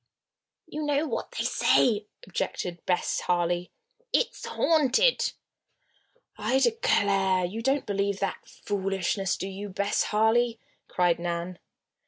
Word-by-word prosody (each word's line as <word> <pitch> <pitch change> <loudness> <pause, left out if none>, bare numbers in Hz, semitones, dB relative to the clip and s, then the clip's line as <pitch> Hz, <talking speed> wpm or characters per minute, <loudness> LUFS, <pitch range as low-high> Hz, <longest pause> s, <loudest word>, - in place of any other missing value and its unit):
"You 305 - -6
know 295 0 +1
what - - -3
they - - -2
say," 215 -3 +3 0.2
objected 175 -1 -4
Bess 180 -1 +1
Harley. 175 0 0 0.4
"It's - - 0
haunted!" 325 - +3 1.1
"I 260 - +1
declare! 200 - +2
you 210 +6 -4
don't 270 +3 +1
believe 200 -1 -1
that 195 -1 -3
foolishness, 195 -1 -2
do 190 - -4
you, 195 +1 -6
Bess 200 +2 0
Harley?" 225 +2 +2 0.3
cried 175 -2 +1
Nan. 175 +1 -3
200 Hz, 115 wpm, -27 LUFS, 185-245 Hz, 1.1 s, say